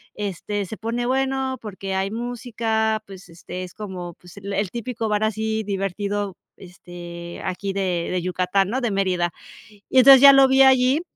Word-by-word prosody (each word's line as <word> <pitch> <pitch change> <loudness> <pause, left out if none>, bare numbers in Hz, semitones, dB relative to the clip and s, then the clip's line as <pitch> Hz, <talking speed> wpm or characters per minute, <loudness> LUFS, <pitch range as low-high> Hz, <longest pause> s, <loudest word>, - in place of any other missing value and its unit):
este, 205 0 -4
se 220 - -8
pone 235 +2 -3
bueno, 265 0 -1
porque 195 -2 -5
hay 190 +1 -1
música, 225 -2 -2
pues, 190 -2 -12
este 180 +2 -8
es 180 - -10
como, 185 -5 -7
pues, 180 +2 -17
el 200 -1 -3
típico 230 -1 -4
bar 210 0 0
así 220 0 -2
divertido, 200 0 -3 0.2
este, 175 -1 -10
aquí 195 +1 -3
de 185 -3 -1
de 180 -1 -1
Yucatán", 185 +2 0
¿no?, 250 +4 -1
de 240 - -1
Mérida. 185 -3 0 0.6
Y - - 0
entonces 270 0 +9
ya 280 0 +10
lo 270 0 +7
vi 265 0 +6
allí. 265 +2 +4
205 Hz, 165 wpm, -22 LUFS, 185-235 Hz, 0.6 s, ya